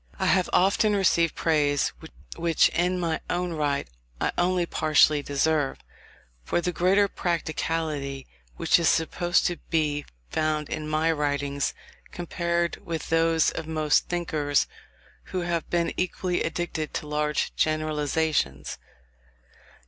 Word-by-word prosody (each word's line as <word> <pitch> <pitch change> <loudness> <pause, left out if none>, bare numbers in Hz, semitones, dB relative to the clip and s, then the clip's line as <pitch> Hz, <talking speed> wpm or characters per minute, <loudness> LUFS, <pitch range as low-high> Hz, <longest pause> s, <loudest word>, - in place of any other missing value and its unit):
I - - -1
have 185 -2 +3
often 200 +3 +3
received 170 -4 +2
praise, 145 -3 +1 0.4
which 165 -1 +3
in 180 +2 0
my 165 -2 -1
own 175 -1 -1
right 145 -3 -1 0.3
I - - +1
only 180 0 +1
partially 155 -2 +3
deserve, 145 0 0 0.7
for 175 - 0
the 180 +1 -1
greater 190 +4 +3
practicality 160 -6 -2 0.3
which - - +3
is 170 - +3
supposed 175 +2 +1
to 175 - 0
be 150 -3 0 0.2
found 155 -1 0
in 155 - -4
my 155 +2 +2
writings, 145 -2 -1 0.4
compared 170 0 -2
with 165 -2 -4
those 165 0 +3
of 160 - -6
most 155 -2 +2
thinkers 155 -5 +1 0.6
who 185 - -3
have 170 -1 -2
been 170 -1 0
equally 180 0 -1
addicted 160 -1 -3
to - - -3
large 150 0 -1
generalizations. 155 - 0
160 Hz, 125 wpm, -26 LUFS, 150-175 Hz, 0.7 s, have